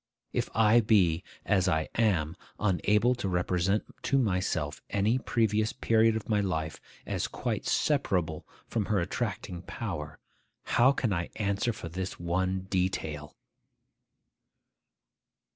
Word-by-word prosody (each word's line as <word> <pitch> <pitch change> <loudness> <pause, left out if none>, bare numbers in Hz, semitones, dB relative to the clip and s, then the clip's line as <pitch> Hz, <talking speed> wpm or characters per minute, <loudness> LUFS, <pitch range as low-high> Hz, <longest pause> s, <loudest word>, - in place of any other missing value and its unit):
If - - -1
I 110 +1 +6
be 90 -6 +3 0.2
(as 95 -3 +2
I 80 -3 +1
am) 90 -8 +1 0.2
unable 105 +4 +3
to 120 -6 -3
represent 90 +3 +1 0.2
to 140 - +1
myself 90 - 0
any 105 +5 +2
previous 110 -3 +1
period 115 0 +3
of 110 - -4
my 105 -2 +2
life 80 -5 -2 0.2
as - - -2
quite - - -3
separable 90 - 0 0.2
from 110 -3 -1
her 105 -1 +1
attracting 90 -2 -3
power, 80 -7 -5 0.5
how 130 +3 +4
can 120 -6 0
I 85 -1 -2
answer 100 +2 0
for 105 -6 -7
this 90 +3 -5
one 95 +2 0
detail? 90 -6 -2
95 Hz, 125 wpm, -29 LUFS, 85-110 Hz, 0.5 s, I